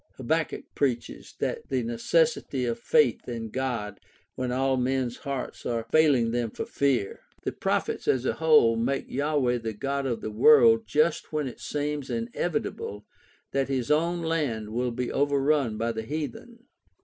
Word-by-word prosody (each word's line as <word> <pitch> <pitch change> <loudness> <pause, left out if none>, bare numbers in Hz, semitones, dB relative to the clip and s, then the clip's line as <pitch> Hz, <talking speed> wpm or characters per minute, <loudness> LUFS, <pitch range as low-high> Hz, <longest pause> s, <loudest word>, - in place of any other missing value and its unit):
Habakkuk 155 +5 -1
preaches 130 -5 -2
the - - -2
necessity 130 +3 +1
of 120 -1 -2
faith 230 - +2
in 115 -2 -5
God 115 -6 -3 0.3
when 130 -1 -3
all 135 +1 +1
men's 125 -1 -1
hearts 140 -2 -5
are 115 -1 -2
failing 140 -8 +4
them 120 -1 -1
for - - -5
fear. 130 -8 0 0.2
The - - -1
prophets - - -2
as 130 -1 +2
a - - +1
whole 150 -8 +5
make 125 +4 -1
Yahweh 140 -3 +1
the 115 -1 -4
God 140 +5 -2
of 120 -3 -2
the 110 - -4
world 225 - +6
just 155 +2 +1
when 150 -3 -1
it 125 - -8
seems 145 -2 -3
inevitable 115 - -3 0.5
that 135 0 0
his 130 -1 -1
own 170 +3 +1
land 140 -10 -1
will 125 +2 0
be 120 +1 -3
overrun 140 -4 +1
by 115 +1 0
the 110 -1 -4
heathen. 155 - -6
130 Hz, 155 wpm, -27 LUFS, 115-150 Hz, 0.5 s, world